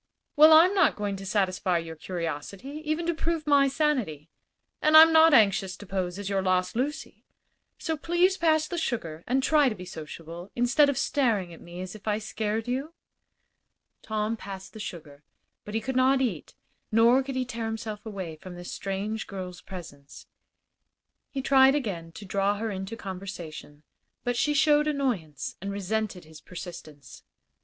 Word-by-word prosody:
"Well, 310 +1 +8
I'm 330 +5 +7
not 375 -6 +4
going 205 -1 -2
to 195 0 -8
satisfy 185 -3 +1
your 165 -1 -5
curiosity, 180 - -5
even 310 +2 -1
to 340 - +1
prove 325 -1 -2
my 285 -2 +5
sanity; 255 - -1 0.5
and 310 +1 +6
I'm 320 +1 +9
not 320 0 +7
anxious 200 -6 +3
to 205 - -11
pose 185 -2 -3
as 205 -1 -5
your 195 -1 0
lost 185 0 +1
Lucy. 285 +6 -3 0.5
So 320 - -2
please 345 +5 +2
pass 315 -3 +2
the 345 - -3
sugar 170 - -3
and 260 +2 +1
try 295 -2 +4
to 220 - -5
be 180 -2 -9
sociable, 165 +1 -9
instead 265 +5 +4
of 280 - -1
staring 225 -11 0
at - - -13
me 175 +1 -9
as 185 0 -6
if 215 0 -13
I 210 -1 +2
scared 220 +1 -3
you." 275 +7 -3 1.1
Tom 215 +1 -2
passed 195 -3 -9
the 220 - -10
sugar, 150 -7 -8 0.4
but 210 - -6
he - - +2
could 260 +4 -4
not 260 +1 +4
eat, 225 - -3 0.4
nor 230 +4 +5
could 270 0 -5
he 260 -1 0
tear 230 -2 -5
himself 220 -1 -5
away 190 -7 -6
from 180 +3 -10
this 175 0 -8
strange 200 +3 -3
girl's 185 -2 -7
presence. 145 -7 -11 1.0
He 270 -2 -4
tried 270 0 +6
again 185 - -3
to 205 - -10
draw 200 +1 0
her 220 +1 -3
into 190 +3 -5
conversation, 180 -7 -8 0.4
but 245 0 -1
she 295 +5 +1
showed 300 +1 +4
annoyance 240 - -2
and 200 +1 -4
resented 200 -2 -3
his 155 -1 -14
persistence. 155 -6 -10
215 Hz, 170 wpm, -27 LUFS, 185-270 Hz, 1.1 s, I'm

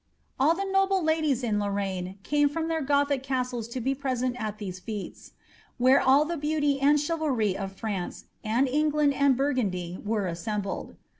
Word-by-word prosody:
All 305 +5 +4
the 395 - -2
noble 390 -1 +2
ladies 310 -5 +1
in 215 -3 +1
Lorraine 195 -2 -2
came 290 +2 +2
from 325 +3 -3
their 325 -1 0
Gothic 280 -1 +1
castles 250 -3 -2
to 235 +2 -5
be 265 +3 0
present 255 -2 -2
at 215 -1 -3
these 185 -3 -6
/V/f«, 210 -2 -7 0.5
where 255 +2 +5
all 275 +3 +5
the 340 +2 -3
beauty 295 -1 0
and 290 +2 +5
chivalry 285 - 0
of 195 -1 -5
France, 195 -3 -4 0.2
and 235 +5 +2
England, 300 +1 +2
and 275 -2 +3
Burgundy, 200 -11 -1
were 210 -1 -1
assembled.' 195 +3 -4
260 Hz, 165 wpm, -27 LUFS, 210-290 Hz, 0.5 s, where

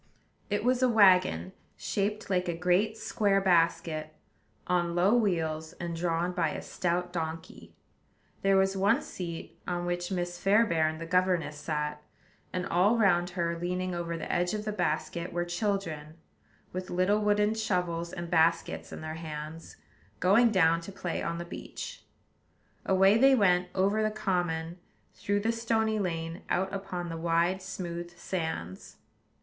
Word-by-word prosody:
It 205 0 0
was 250 +1 +2
a 255 - +4
wagon, 180 - +4 0.2
shaped 210 +1 -2
like 185 -1 0
a 170 - -2
great 185 +5 +2
square 200 -3 +1
basket, 165 -4 +1 0.5
on 175 -1 0
low 185 +5 +4
wheels, 160 -8 0
and 170 -1 -5
drawn 170 +1 0
by 165 -3 0
a - - -5
stout 180 0 -2
donkey. 165 -1 -6 0.7
There 195 0 +4
was 190 0 +2
one 200 +8 +2
seat, 170 -3 -7
on 175 -1 -2
which 175 +1 -2
Miss 175 -1 -3
Fairbairn 175 -6 +3
the 165 - -6
governess 175 -4 +1
sat; 150 0 -3 0.5
and 180 0 -2
all 195 +5 +3
round 180 -5 +3
her, 170 -1 0
leaning 180 +1 -2
over 170 -1 -3
the - - -5
edge 175 +3 +1
of 210 0 -4
the 215 - -1
basket, 170 -2 -2
were 175 0 -1
children, 175 -5 -2 0.6
with 185 0 -5
little 185 +4 +2
wooden 210 0 +2
shovels 180 -6 -1
and 175 0 -5
baskets 165 0 +1
in - - -7
their 155 0 -5
hands, 155 +1 -7 0.4
going 210 +7 +5
down 165 -5 +3
to 170 - -8
play 180 -3 -4
on 170 - -2
the 170 - -5
beach. 175 - -8 0.8
Away 195 +3 +5
they 270 +1 +6
went, 180 -5 +3
over 200 +3 +2
the 215 - +2
common, 175 -5 -2 0.3
through 205 0 -1
the 225 +2 +1
stony 225 -1 0
lane, 165 -2 -3
out 190 +2 0
upon 180 -3 -4
the 165 - -4
wide, 170 +3 +1
smooth 175 -2 -6
sands. 160 - -5
180 Hz, 155 wpm, -29 LUFS, 165-195 Hz, 0.8 s, they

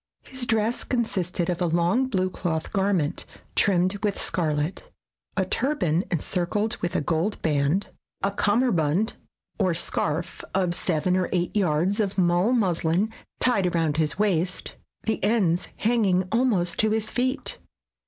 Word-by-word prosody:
His 260 -2 -4
dress 225 +1 +1
consisted 185 -8 -1
of 175 0 -2
a 175 - +2
long 175 +10 +2
blue 185 -6 0
cloth 160 -3 -3
garment, 190 -7 0 0.3
trimmed 185 +1 +2
with 205 -2 0
scarlet, 160 - 0 0.5
a 190 - +2
turban 185 - 0
encircled 180 +6 0
with 175 - -3
a - - +2
gold 165 +7 -1
band, 150 +4 +1 0.3
a 195 - +2
cummerbund 205 - +1 0.5
or 185 -4 +2
scarf 165 0 -1
of 185 -2 +1
seven 175 +1 0
or 185 -1 0
eight 175 +1 -1
yards 185 +1 +1
of 200 -2 -1
mull 175 +4 +3
muslin 190 -2 +1 0.3
tied 210 -7 +3
around 160 -3 +1
his 155 -1 0
waist, 185 -3 0 0.3
the 220 - -1
ends 190 -5 +2
hanging 205 -5 +2
almost 220 -8 +1
to 220 - +4
his 220 0 -1
feet. 255 +2 -1
185 Hz, 140 wpm, -25 LUFS, 170-215 Hz, 0.5 s, to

